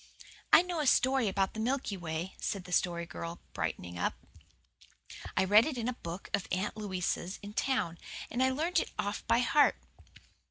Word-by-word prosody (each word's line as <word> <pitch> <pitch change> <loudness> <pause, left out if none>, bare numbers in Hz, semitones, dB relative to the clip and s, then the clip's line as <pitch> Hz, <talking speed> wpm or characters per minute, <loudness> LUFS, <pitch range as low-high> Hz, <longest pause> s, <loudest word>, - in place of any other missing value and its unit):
"I 315 - +9
know 355 -2 -3
a 300 - +1
story 260 -2 +4
about 195 0 0
the 220 - -6
Milky 250 -2 -1
Way," 170 0 -4
said 200 -3 -2
the 180 - -11
Story 170 -1 +1
Girl, 170 0 -6
brightening 90 0 -3
up. - - 0 1.2
"I - - +5
read 210 +6 +6
it 295 -5 -3
in 230 -1 -2
a 250 - 0
book 175 -5 -7
of 200 -2 0
Aunt 190 +4 -1
Louisa's 190 -2 -2
in 205 0 -7
town, 210 -10 0 0.3
and 245 - -1
I 260 - +5
learned 320 +6 +1
it - - -2
off 205 +1 -2
by 235 - +4
heart. 285 +4 +4
205 Hz, 185 wpm, -32 LUFS, 180-260 Hz, 1.2 s, I